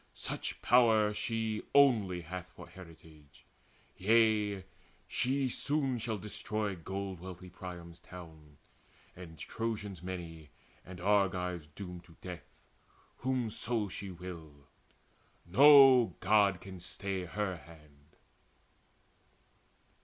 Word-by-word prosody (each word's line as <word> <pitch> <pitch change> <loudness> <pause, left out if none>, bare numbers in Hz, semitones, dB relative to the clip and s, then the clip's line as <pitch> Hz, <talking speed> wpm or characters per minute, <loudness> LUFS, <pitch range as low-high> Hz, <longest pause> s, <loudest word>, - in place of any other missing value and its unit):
Such - - -5
power 110 -3 +5
She 110 0 -2
only 110 -11 +5
hath 90 +2 -7
for - - -12
heritage. 80 -4 -15 0.5
Yea, 105 -1 +3 0.4
she 135 +1 0
Soon 135 -1 -1
shall 110 -1 -2
destroy 105 0 -3
gold 95 +2 -5
wealthy 90 0 -9
Priam's 90 -2 -9
town, 80 -5 -13 0.6
And 85 -3 -11
Trojans 100 +2 -4
many 85 -4 -7 0.3
and 90 -1 -10
Argives 90 -4 +1
doom 90 -3 -7
to 85 -1 -19
death, 90 -2 -8 0.7
Whomso 120 -4 -1
she 100 +1 -6
will. 85 -5 -10 0.8
No 130 - +7
God 100 -2 +3
can 95 -1 -9
stay 95 +1 -4
her 95 0 -2
hand." 75 -2 -18
95 Hz, 100 wpm, -32 LUFS, 85-110 Hz, 0.8 s, No